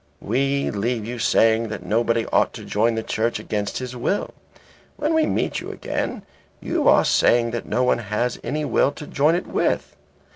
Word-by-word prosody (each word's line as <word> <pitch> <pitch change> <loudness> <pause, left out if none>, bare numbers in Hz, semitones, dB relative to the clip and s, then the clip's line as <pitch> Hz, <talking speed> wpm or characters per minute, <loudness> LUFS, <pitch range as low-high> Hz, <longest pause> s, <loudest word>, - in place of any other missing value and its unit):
We 135 +5 0
leave 110 +2 -2
you 120 +1 -5
saying 115 0 +3
that 105 -4 -6
nobody 115 +3 +1
ought - - +3
to - - -9
join 115 +3 +1
the 110 - -2
Church 115 +2 -1
against 105 -1 -3
his 125 -1 -5
will. 125 +11 -1 0.6
When 300 +2 0
we 320 -1 +3
meet - - -1
you - - -7
again - - -4 0.4
you - - -1
are - - +6
saying 120 -1 +3
that 120 0 -4
no 125 +4 +1
one 125 - +2
has 115 +3 -2
any 150 +1 -2
will 140 - +2
to 150 - -9
join 150 +4 +2
it 180 - -2
with. - - -1
120 Hz, 185 wpm, -22 LUFS, 110-135 Hz, 0.6 s, are